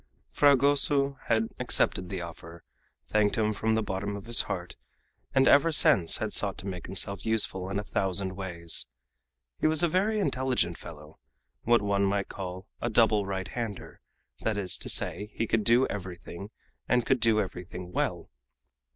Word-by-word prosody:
Fragoso 140 Hz, 0 st, +3 dB
had 115 Hz, -1 st, +1 dB
accepted 90 Hz, -1 st, +1 dB
the 95 Hz, -3 st, -4 dB
offer, 85 Hz, 0 st, -10 dB, 0.4 s
thanked 105 Hz, -1 st, +1 dB
him 110 Hz, -1 st, +1 dB
from 110 Hz, +2 st, 0 dB
the 110 Hz, -, 0 dB
bottom 100 Hz, +1 st, -3 dB
of 100 Hz, -, -8 dB
his 120 Hz, 0 st, +6 dB
heart, -, -, -5 dB, 0.6 s
and 135 Hz, 0 st, +5 dB
ever 145 Hz, +4 st, +5 dB
since 90 Hz, -, +4 dB
had -, -, -3 dB
sought -, -, +2 dB
to -, -, -7 dB
make 90 Hz, -3 st, -6 dB
himself 95 Hz, +1 st, -1 dB
useful 100 Hz, -4 st, 0 dB
in 100 Hz, -, -3 dB
a 105 Hz, -, -2 dB
thousand 95 Hz, -1 st, -1 dB
ways. 85 Hz, -4 st, -2 dB, 0.7 s
He -, -, +2 dB
was 155 Hz, +1 st, +1 dB
a -, -, +5 dB
very 200 Hz, +6 st, +1 dB
intelligent 130 Hz, -, -1 dB
fellow 75 Hz, -1 st, -12 dB, 0.5 s
what 120 Hz, -2 st, +3 dB
one 100 Hz, -1 st, +1 dB
might 100 Hz, 0 st, -1 dB
call 95 Hz, 0 st, -7 dB
a 120 Hz, -, -1 dB
"double 110 Hz, -3 st, +3 dB
right 95 Hz, -1 st, -4 dB
hander" 115 Hz, -5 st, -6 dB, 0.4 s
that 110 Hz, -2 st, -2 dB
is 90 Hz, -3 st, -1 dB
to -, -, -4 dB
say, 95 Hz, +4 st, 0 dB
he 115 Hz, -, -1 dB
could 110 Hz, -1 st, 0 dB
do 120 Hz, +5 st, +4 dB
everything, 95 Hz, 0 st, -7 dB, 0.4 s
and 125 Hz, -1 st, +2 dB
could 130 Hz, -, +2 dB
do 115 Hz, -2 st, +3 dB
everything 90 Hz, -2 st, -6 dB
well. -, -, -2 dB
100 Hz, 170 wpm, -28 LUFS, 95-120 Hz, 0.7 s, his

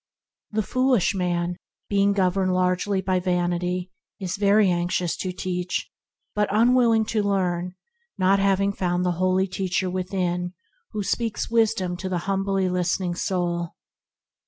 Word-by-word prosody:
The 215 Hz, 0 st, -1 dB
foolish 255 Hz, -2 st, +2 dB
man, 175 Hz, -2 st, -1 dB, 0.3 s
being 200 Hz, 0 st, +3 dB
governed 185 Hz, -1 st, +1 dB
largely 185 Hz, +2 st, +1 dB
by 185 Hz, 0 st, +1 dB
vanity, 180 Hz, 0 st, -1 dB, 0.3 s
is 190 Hz, +1 st, -4 dB
anxious 180 Hz, -4 st, +2 dB
to 185 Hz, -, -3 dB
teach 180 Hz, 0 st, -3 dB, 0.4 s
but 210 Hz, -1 st, +1 dB
unwill 235 Hz, +2 st, +4 dB
ing 220 Hz, 0 st, +2 dB
to 215 Hz, 0 st, 0 dB
learn, 180 Hz, -3 st, -1 dB, 0.4 s
not 195 Hz, +1 st, +3 dB
having 195 Hz, 0 st, +2 dB
found 180 Hz, -1 st, 0 dB
the 180 Hz, -, +2 dB
Holy 185 Hz, +1 st, +3 dB
Teacher 185 Hz, -1 st, -1 dB
within 180 Hz, -1 st, -2 dB, 0.4 s
who 210 Hz, -1 st, -2 dB
speaks 225 Hz, +2 st, -2 dB
wisdom 225 Hz, -6 st, +2 dB
to 190 Hz, +1 st, -4 dB
the 180 Hz, -, 0 dB
humbly 195 Hz, -1 st, 0 dB
listening 180 Hz, 0 st, 0 dB
soul. 175 Hz, -2 st, -2 dB
185 Hz, 135 wpm, -24 LUFS, 180-200 Hz, 0.4 s, unwill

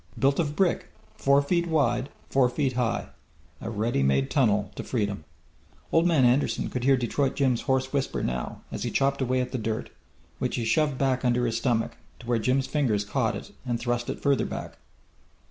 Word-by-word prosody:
Built 140 Hz, +1 st, +2 dB
of 150 Hz, -3 st, 0 dB
brick, 190 Hz, -1 st, +1 dB, 0.3 s
four 140 Hz, +1 st, +3 dB
feet 170 Hz, +3 st, +1 dB
wide, 140 Hz, -5 st, +1 dB, 0.2 s
four 130 Hz, -2 st, +4 dB
feet 135 Hz, 0 st, 0 dB
high. 120 Hz, -2 st, -1 dB, 0.5 s
A -, -, -4 dB
ready 110 Hz, -7 st, 0 dB
made 70 Hz, 0 st, +2 dB
tunnel 105 Hz, -7 st, +2 dB
to -, -, -6 dB
freedom! 100 Hz, -9 st, -2 dB, 0.7 s
Old 165 Hz, +1 st, +4 dB
Man 155 Hz, -7 st, +4 dB
Anderson 125 Hz, +4 st, +2 dB
could 125 Hz, -, -3 dB
hear 135 Hz, -1 st, +5 dB
Detroit 130 Hz, +3 st, 0 dB
Jim's 130 Hz, -4 st, +2 dB
hoarse 130 Hz, -1 st, 0 dB
whisper 135 Hz, -1 st, -1 dB
now, 60 Hz, 0 st, -3 dB
as -, -, -5 dB
he -, -, -1 dB
chopped 140 Hz, 0 st, +1 dB
away 130 Hz, 0 st, +1 dB
at 125 Hz, -, -4 dB
the 130 Hz, -, -2 dB
dirt, 110 Hz, 0 st, -3 dB, 0.5 s
which -, -, -1 dB
he 115 Hz, -, -2 dB
shoved 150 Hz, +2 st, +2 dB
back 130 Hz, -1 st, +1 dB
under 125 Hz, 0 st, +2 dB
his 115 Hz, -1 st, 0 dB
stomach, 115 Hz, -2 st, 0 dB, 0.2 s
to -, -, -13 dB
where 120 Hz, -1 st, +1 dB
Jim's 130 Hz, +4 st, +1 dB
fingers 115 Hz, -10 st, 0 dB
caught 115 Hz, +1 st, 0 dB
it -, -, -8 dB
and 120 Hz, -3 st, -2 dB
thrust 120 Hz, 0 st, -1 dB
it -, -, -3 dB
farther 140 Hz, -2 st, +2 dB
back. -, -, -7 dB
125 Hz, 195 wpm, -27 LUFS, 115-140 Hz, 0.7 s, hear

